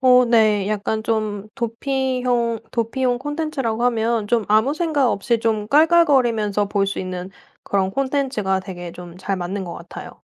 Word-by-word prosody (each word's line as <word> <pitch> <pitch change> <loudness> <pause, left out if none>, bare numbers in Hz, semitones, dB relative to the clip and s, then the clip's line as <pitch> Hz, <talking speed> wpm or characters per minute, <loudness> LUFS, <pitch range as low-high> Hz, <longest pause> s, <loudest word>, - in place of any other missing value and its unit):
어. 250 -1 +6
네. 215 -4 +3
약간 215 +1 -1
좀 215 -2 -2
도피형 245 -1 -1
도피용 245 +1 0
콘텐츠라고 290 -5 -2
하면 230 -2 +1
좀 230 -3 +2
아무 220 +7 +3
생각 310 -7 +1
없이 230 +4 0
좀 220 -2 0
깔깔거리면서 260 - +3
볼 200 -1 +1
수 195 - -3
있는 185 0 -5 0.3
그런 190 -1 0
콘텐츠가 260 -7 -1
되게 175 -3 -8
좀 175 -1 -11
잘 190 +1 -3
맞는 190 +2 -4
것 175 - -6
같아요. 170 - -10
225 Hz, 300 characters per minute, -21 LUFS, 200-255 Hz, 0.3 s, 어